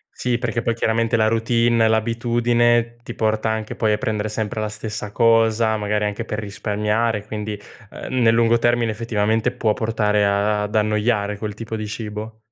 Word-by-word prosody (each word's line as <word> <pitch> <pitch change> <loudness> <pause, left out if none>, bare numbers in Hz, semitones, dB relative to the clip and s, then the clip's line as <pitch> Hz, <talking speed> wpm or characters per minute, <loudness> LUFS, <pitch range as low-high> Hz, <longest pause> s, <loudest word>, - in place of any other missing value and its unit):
Sì, 125 -1 0
perché 120 -1 -2
poi 115 - -1
chiaramente 115 0 +1
la 110 -1 +3
routine, 115 0 +2
l'abitudine, 120 +1 +1
ti 120 - -8
porta 110 0 0
anche 110 -1 -3
poi 110 -2 +1
a 105 - +1
prendere 110 -1 -2
sempre 110 0 -3
la 105 - -2
stessa 105 -1 -6
cosa, 115 -1 +3
magari 105 0 -1
anche 105 +3 -3
per 105 -1 -5
risparmiare, 105 +1 -1
quindi, 105 -1 -5 0.3
ehm, 130 -1 -3
nel 115 -1 +5
lungo 115 0 +3
termine 120 -1 +2
effettivamente 110 0 0
può 110 -2 0
portare 105 -2 +1
a 100 +1 +2
ad 105 +1 -5
annoiare 105 -1 +1
quel 105 -1 -5
tipo 115 0 -6
di 110 -1 -4
cibo. 110 0 -6
110 Hz, 175 wpm, -21 LUFS, 105-115 Hz, 0.3 s, nel